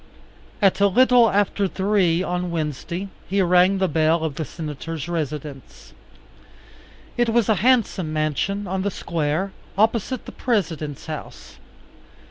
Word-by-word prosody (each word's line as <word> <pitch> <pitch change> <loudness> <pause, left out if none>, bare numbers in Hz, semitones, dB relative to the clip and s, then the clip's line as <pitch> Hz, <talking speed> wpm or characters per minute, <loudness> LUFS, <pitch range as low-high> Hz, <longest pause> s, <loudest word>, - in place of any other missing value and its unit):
At 195 0 +4
a 200 - +5
little 245 +2 +5
after 205 0 +1
three 190 -3 +1
on 180 -1 -2
Wednesday 170 +3 -3 0.2
he 200 +2 0
rang 180 +2 +4
the 190 0 +1
bell 160 +1 +2
of 160 -3 -2
the 160 - -4
Senator's 155 0 -6
residence. 150 -4 -6 1.2
It 240 -1 +2
was 225 -1 +2
a 220 - +4
handsome 225 -9 +2
mansion 155 +7 -1
on 190 0 -2
the 200 - 0
Square 170 +1 -2 0.3
opposite 225 +4 +1
the - - -8
President's 160 - -2
house. 155 -2 -8
180 Hz, 130 wpm, -22 LUFS, 155-200 Hz, 1.2 s, a